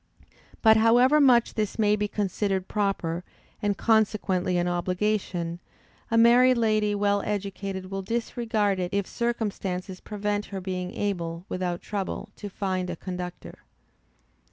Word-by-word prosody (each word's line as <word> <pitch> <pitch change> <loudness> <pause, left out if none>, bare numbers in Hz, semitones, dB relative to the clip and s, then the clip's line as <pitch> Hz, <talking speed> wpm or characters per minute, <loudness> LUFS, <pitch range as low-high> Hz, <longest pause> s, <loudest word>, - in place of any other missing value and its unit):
But 220 -1 +7
however 245 +6 +5
much 245 -4 +5
this 215 -2 -2
may 210 -1 +3
be 210 0 -1
considered 195 -2 -1
proper, 185 -5 -1 0.4
and 205 -2 0
consequently 205 -5 +1
an 175 0 +1
obligation, 180 -1 -1 0.5
a 230 - +2
married 245 +2 +6
lady 215 -2 +2
well 205 0 +1
educated 195 -2 -4
will 195 0 -2
disregard 220 -2 -1
it 180 +1 -2
if 200 -1 +1
circumstances 195 -6 -3
prevent 205 0 -2
her 195 - -6
being 185 -1 -4
able, 170 -4 -3
without 180 -1 -3
trouble, 200 -2 -4
to 205 - -6
find 185 -2 -2
a 175 - -3
conductor. 180 0 -7
200 Hz, 130 wpm, -26 LUFS, 185-215 Hz, 0.5 s, But